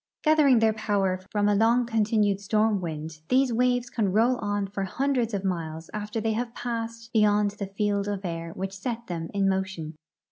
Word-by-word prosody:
Gathering 305 -5 +5
their 220 -1 +3
poAver 195 -3 -1
from 205 -1 +1
a 205 - +4
long 230 +4 +3
continued 215 -3 +1
storm 210 0 +1
Avind, 155 -2 -6
these 260 0 +3
Avaves 245 +1 +1
can 210 -6 0
roll 235 +5 +3
on 205 -2 -1
for 195 0 -4
hundreds 255 +2 0
of 200 -2 -3
miles 165 -3 -3
after 210 +1 -3
they 220 0 0
have 235 +1 -3
passed 230 -1 -5
beyond 210 -2 +3
the 200 -1 -6
field 200 0 -1
of 200 -1 -3
air 165 -1 -4
Avhich 195 +1 -4
set 235 +4 -4
them 165 -4 -4
in 200 -1 +1
motion. 190 -5 -2
210 Hz, 185 wpm, -26 LUFS, 190-230 Hz, -, Gathering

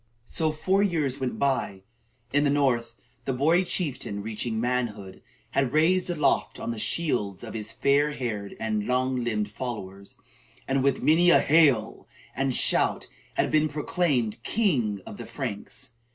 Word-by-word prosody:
So 160 +5 -1
four 185 +5 0
more - - +4
years 150 -8 0
went 130 -2 -3
by. 130 -8 -1 0.5
In 145 0 +3
the 145 - +3
north, 125 -5 +1 0.3
the 135 - -1
boy 160 +8 +3
chieftain, 140 - -2
reaching 110 +1 -3
manhood, 115 -5 -2 0.3
had 135 - +2
been 125 - -5
raised 180 +4 +3
aloft 150 -5 0
on - - -3
the 115 - -5
shields 105 - 0
of 115 - -7
his 110 -2 -5
fair 145 +2 +2
haired 110 -8 -5
and 110 -2 -2
long 130 0 0
limbed 105 -3 -1
followers, 100 -5 -7 0.5
and 135 0 +1
with 140 -1 +1
many 165 +5 +5
a 175 - +7
"hael!" 140 -8 +3 0.3
and 135 +1 0
shout - - +2 0.3
had - - +1
been 155 0 +3
proclaimed 140 - -1
"King 125 - 0
of 100 - -9
the - - -8
Franks." 120 -8 -6
130 Hz, 160 wpm, -26 LUFS, 110-150 Hz, 0.5 s, a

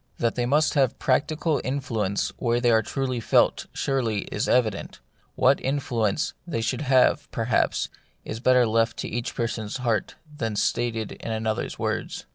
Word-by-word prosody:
That 115 -1 +1
they 120 -1 -1
must 150 +4 +3
have 135 -5 +2
practical 150 +3 +1
influence 115 -7 -1
where 120 -1 +1
they 120 -1 +3
are 110 -1 +5
truly 130 +2 -2
felt, 115 - +2
surely 115 -7 -1
is 105 - -1
evident: 110 -5 0 0.4
what 130 +2 +3
influence 130 -4 0
they 115 -9 -2
should 115 - -1
have, 135 +1 +3
perhaps, 115 +1 0 0.4
is 110 - -5
better 125 0 +4
left 115 0 +1
to - - -3
each 120 +2 -4
person's 115 -2 -2
heart 115 -5 -1 0.2
than 115 -7 -2
stated 115 0 0
in - - -6
another's 110 0 -2
words. - - -3
120 Hz, 155 wpm, -25 LUFS, 110-130 Hz, 0.4 s, are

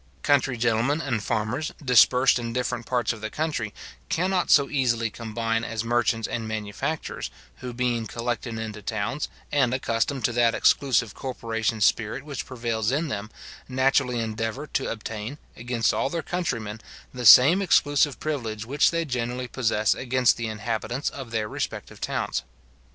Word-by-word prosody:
Country 135 -3 +2
gentlemen 120 +5 +1
and 125 -8 -1
farmers, 115 +10 -2
dispersed 125 -1 +5
in 115 -1 -4
different 125 -1 -2
parts 125 -2 +1
of 110 - -11
the 110 - -3
country, 150 -8 -2 0.4
cannot 180 +1 +1
so 140 -2 +6
easily 120 -5 0
combine 115 0 -2
as 115 -1 -3
merchants 115 -1 +1
and 115 -2 -3
manufacturers, 105 -2 -4 0.3
who 125 -1 -6
being 120 -2 -1
collected 115 0 -3
into 110 -1 -5
towns, 110 +7 -2 0.2
and 135 -4 +2
accustomed 125 0 -1
to 120 - +2
that 120 -1 +3
exclusive 120 -5 +3
corporation 115 -4 -3
spirit 110 +5 +1
which 145 -3 -5
prevails 115 -3 -1
in 150 +3 0
them, 105 -2 -4 0.4
naturally 130 -1 +2
endeavour 115 +5 -3
to 135 -2 -2
obtain, 110 +3 -5 0.2
against 120 -1 0
all 135 - 0
their 165 +1 -3
countrymen, 115 -12 -3 0.3
the 125 -1 -5
same 140 - +9
exclusive 145 -6 +3
privilege 115 -8 -3
which 140 +5 +3
they 165 0 -1
generally 125 -1 -3
possess 110 -4 +1
against 130 -1 +2
the 115 -1 -3
inhabitants 110 +4 -3
of 135 -5 -8
their 110 -2 -1
respective - - -5
towns. - - -1
120 Hz, 150 wpm, -25 LUFS, 115-135 Hz, 0.4 s, same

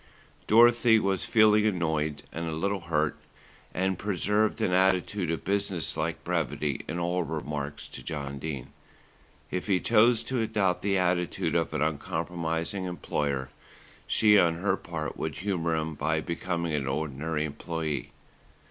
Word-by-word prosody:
Dorothy 120 +1 +6
was 100 -3 0
feeling 110 -1 +5
annoyed 80 -6 -1
and 85 +1 -3
a 80 - -3
little 100 +4 -1
hurt; 80 -3 0 0.5
and 95 0 -1
preserved 105 +2 +1
an - - +1
attitude 95 0 +2
of 80 - -2
businesslike 100 -4 -1
brevity 75 -3 -1
in 80 - -3
all 90 +1 0
her 80 0 -4
remarks 75 -1 -4
to - - -9
John 70 -3 -5
Dene. 70 -4 -5 0.8
If 90 +2 -3
he 95 -3 +3
chose 115 +2 +4
to 130 -2 -1
adopt 105 -5 +1
the 100 -1 +1
attitude 90 -1 0
of - - +1
the 75 - +1
uncompromising 80 +4 -3
employer, 70 -6 -2 0.6
she 105 -2 +5
on 85 -2 +3
her 95 +5 +1
part 80 -3 -5
would 80 -3 -3
humour 85 -4 -1
him 80 0 -2
by 80 +2 0
becoming 85 0 -3
an 70 -3 -1
ordinary 75 +2 -2
employee. 75 -2 -4
85 Hz, 145 wpm, -28 LUFS, 80-100 Hz, 0.8 s, Dorothy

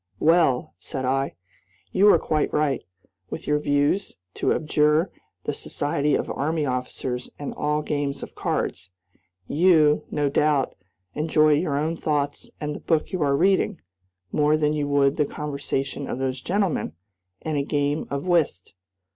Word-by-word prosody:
"Well," 160 -6 +3
said 130 -1 -4
I, 135 -3 0 0.6
"you 205 +2 +6
are - - +6
quite 155 -1 0
right, 150 -3 +1 0.5
with - - -6
your 150 0 +2
views, 145 +7 +1 0.2
to - - 0
abjure 150 +2 +2 0.3
the - - -2
society 145 0 -1
of - - -1
army 155 +2 -1
officers 125 -1 -3
and 145 - -5
all 150 0 -1
games 145 -2 -2
of - - -8
cards. 90 +1 -2 0.6
You, 155 -3 +4
no 145 -1 0
doubt, 145 -1 +2 0.4
enjoy 155 0 +3
your 145 -1 +1
own 155 +3 0
thoughts 145 -2 -1
and 150 0 -3
the - - -6
book 160 -2 0
you 185 -3 -2
are 140 -1 +2
reading, 190 +4 +2 0.5
more 150 +1 +3
than 150 -1 +1
you 150 -1 -1
would 140 0 +3
the 150 - +3
conversation 140 -1 -3
of - - -2
those 130 0 -2
gentlemen 190 - 0 0.5
and 155 -1 -2
a - - +2
game 145 +1 -1
of 140 +2 -3
whist. 160 - +1
150 Hz, 155 wpm, -24 LUFS, 140-155 Hz, 0.6 s, you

